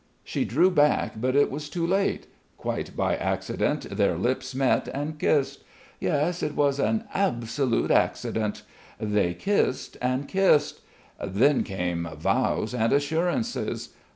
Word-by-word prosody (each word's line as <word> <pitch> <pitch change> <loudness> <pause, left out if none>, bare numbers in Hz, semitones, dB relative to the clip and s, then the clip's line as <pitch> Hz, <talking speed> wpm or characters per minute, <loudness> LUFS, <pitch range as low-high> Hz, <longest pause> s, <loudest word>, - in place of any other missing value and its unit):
She - - -2
drew 170 +10 +3
back, 145 -8 +2
but 130 +2 +1
it 145 - +4
was 145 +2 -5
too 165 +2 -2
late; 195 +3 0 0.3
quite - - -4
by - - +1
accident - - -1
their 100 -5 +2
lips 130 +5 -1
met 135 -1 +2
and 150 +2 -4
kissed; 140 -2 +1 0.4
yes, 165 +3 0
it 150 -1 -2
was 140 -1 +2
an 220 +9 +1
absolute 120 - 0
accident! 105 -2 0 0.4
They 105 -5 0
kissed 200 -9 0
and 130 +3 -1
kissed. 185 -6 +3 0.4
Then 120 +10 +3
came 90 -3 -3
vows 105 +8 0
and 115 -2 +1
assurances.... 165 - 0
140 Hz, 130 wpm, -26 LUFS, 115-155 Hz, 0.4 s, it